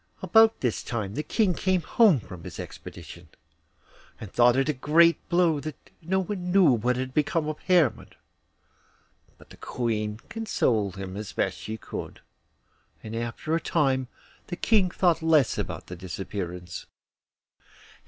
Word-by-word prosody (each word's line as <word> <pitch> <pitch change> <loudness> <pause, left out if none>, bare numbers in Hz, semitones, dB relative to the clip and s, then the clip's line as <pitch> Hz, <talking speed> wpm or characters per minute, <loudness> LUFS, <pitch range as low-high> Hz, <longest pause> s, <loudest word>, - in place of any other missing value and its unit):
About 225 0 +5
this 125 -4 0
time 110 -5 -4
the 150 - -2
King 185 +5 +1
came 185 +1 +1
home 200 - +4
from 90 -5 -11
his - - -9
expedition, 85 -2 -10 0.9
and 105 - -9
thought 120 0 +5
it 135 +2 +1
a 150 - +1
great 160 +5 +3
blow 170 -3 +3
that 155 0 -6 0.3
no 190 +4 0
one 180 -1 -4
knew 185 -6 +6
what 125 +1 +1
had 130 +1 -4
become 150 +2 0
of 155 0 -4
Hermod; 170 - +2 1.2
but - - -19
the - - -13
Queen 110 -3 -2
consoled 115 - 0
him 95 -1 -6
as 105 0 -6
best - - -1
she 110 +1 -6
could, - - -7 0.8
and 110 +1 -6
after 120 +7 -3
a - - +1
time 135 -5 +1 0.4
the 175 - -4
King 195 0 +2
thought 175 -2 +2
less 160 -5 +3
about - - -5
his 90 -1 -8
disappearance. 90 -1 -6
135 Hz, 150 wpm, -26 LUFS, 110-170 Hz, 1.2 s, knew